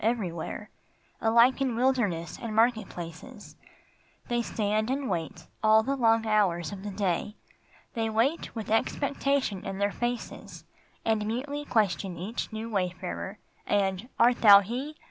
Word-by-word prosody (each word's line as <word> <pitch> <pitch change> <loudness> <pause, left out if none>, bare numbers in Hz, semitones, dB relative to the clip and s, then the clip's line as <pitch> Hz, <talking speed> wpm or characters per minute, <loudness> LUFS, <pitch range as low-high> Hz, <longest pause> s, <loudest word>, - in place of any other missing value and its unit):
Every 220 -5 0
where, 170 +5 -6 0.5
Alike 235 +4 +4
in 260 -4 0
wilderness 225 - 0
and 225 -2 -4
market 225 -2 +3
places, 175 +7 -9 0.7
They 240 0 +1
stand 215 0 -1
and 270 +1 -1
wait 165 -3 -4 0.2
all 220 0 +5
the 275 +4 -1
long 225 -3 +3
hours 190 -7 +1
of 200 0 -7
day. 200 +1 -1 0.6
They 225 -1 -1
wait 240 +10 0
with 220 -2 -5
expectation 275 -2 0
in 195 - -5
their 200 +1 +1
faces 240 +2 -5 0.4
And 220 -2 +1
mutely 285 +6 -3
question 195 -6 0
each 205 +9 -4
new 220 +1 -5
wayfarer, 190 -1 -3 0.3
And 195 +2 0
" - - -41
Art 240 +1 +4
thou 200 -3 +9
he 255 +9 -5
220 Hz, 145 wpm, -28 LUFS, 195-240 Hz, 0.7 s, thou